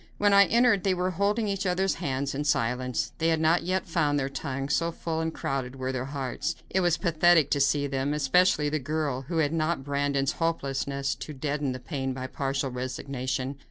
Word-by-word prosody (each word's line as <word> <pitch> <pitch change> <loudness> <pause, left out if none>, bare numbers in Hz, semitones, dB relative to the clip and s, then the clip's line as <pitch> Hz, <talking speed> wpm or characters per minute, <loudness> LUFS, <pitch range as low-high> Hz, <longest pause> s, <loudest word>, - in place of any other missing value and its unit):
When 205 -1 +3
I 200 0 +8
entered 235 -4 +3
they 190 -2 +2
were 180 +1 0
holding 205 +5 0
each 195 -1 -1
other's 190 +1 +1
hands, 135 0 -1
in 145 +2 -2
silence. 125 -3 0
They 165 - +2
had 160 -1 +2
not 160 +2 +3
yet 185 +2 -1
found 155 -4 +1
their 135 0 -1
tongues, 140 0 -3
so 170 0 0
full 160 -1 -3
and 160 0 -1
crowded 135 -4 -3
were 130 0 -3
their 130 -1 -3
hearts. 135 -2 -3 0.2
It 190 - +2
was 175 -2 +2
pathetic 170 -3 +3
to 145 - +2
see 140 +1 +2
them, 135 0 -1
especially 150 +2 +3
the 155 +1 0
girl, 145 -2 -2
who 170 - -2
had 155 -1 +2
not 160 -3 0
Brandon's 140 -1 0
hopelessness 140 -3 -1
to 155 - -8
deaden 145 0 -2
the 130 - -5
pain 135 0 -3
by 130 0 -5
partial 135 0 -2
resignation. 130 +1 -3
145 Hz, 200 wpm, -27 LUFS, 135-170 Hz, 0.2 s, I